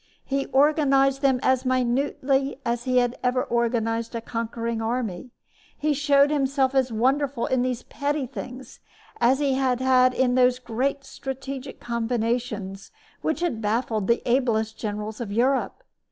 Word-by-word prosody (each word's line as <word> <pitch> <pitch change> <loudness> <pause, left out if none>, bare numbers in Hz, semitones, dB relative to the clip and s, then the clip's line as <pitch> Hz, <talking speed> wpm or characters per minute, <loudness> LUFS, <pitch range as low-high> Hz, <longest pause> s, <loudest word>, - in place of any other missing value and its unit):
He 275 0 -1
organized 275 -1 +3
them 265 -3 +3
as 260 -1 +2
minutely 265 +2 0
as 235 0 -1
he 255 -1 +1
had 245 0 +1
ever 250 0 +1
organized 230 -1 -1
a - - -1
conquering 230 0 -3
army. 225 -2 -3 0.5
He 300 0 +1
showed 285 0 +3
himself 275 -2 +1
as 260 -2 +2
wonderful 260 +3 +1
in 260 -1 +1
these 250 -1 -2
petty 290 -1 -2
things 255 0 -9 0.4
as 245 +3 +4
he 280 -1 +1
had 260 -2 +1 0.4
in 255 -1 +2
those 250 0 +4
great 260 +3 -2
strategic 270 0 -7
combinations 230 -4 -2 0.3
which 315 +1 -1
had 325 -11 -1
baffled 220 -1 -1
the 235 - +2
ablest 230 -3 +1
generals 210 +1 -5
of 215 -4 -4
Europe. 260 - 0
255 Hz, 140 wpm, -25 LUFS, 230-270 Hz, 0.5 s, as